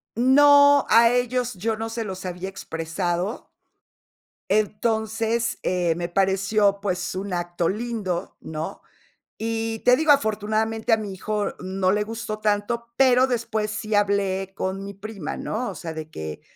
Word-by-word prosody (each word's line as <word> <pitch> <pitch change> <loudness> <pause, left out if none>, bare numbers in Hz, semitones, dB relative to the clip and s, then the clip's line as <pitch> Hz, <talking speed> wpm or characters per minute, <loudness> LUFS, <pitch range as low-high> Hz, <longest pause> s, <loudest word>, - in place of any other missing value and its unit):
No, 285 +3 +6
a 230 0 +7
ellos 245 0 0
yo 220 +4 -2
no 225 +1 -4
se 225 0 -4
los 190 -2 -6
había 180 +1 -5
expresado 175 +2 -3 1.0
entonces, 220 +2 0
eh, 175 -2 +1
me 175 0 -3
pareció, 195 +2 +2
pues, 185 -3 -2
un 190 +1 -4
acto 175 -1 -1
lindo, 210 -5 -3
¿no? 155 0 -6 0.5
Y 225 0 -2
te 250 0 +5
digo, 315 -1 +5
afortunadamente 220 -2 0
a 225 - +7
mi 210 -3 -5
hijo 210 +2 -2
no 185 0 0
le 210 +1 +1
gustó 225 0 -5
tanto, 215 +3 -1
pero 255 -1 +5
después 225 -4 -1
sí 215 0 -3
hablé 195 -2 +1
con 195 +1 -3
mi 200 - -7
prima, 200 -4 -6
¿no? 230 -1 -3
O - - -8
sea, 165 -2 -6
de 155 -1 -7
que 80 - -7
210 Hz, 150 wpm, -24 LUFS, 190-230 Hz, 1.0 s, a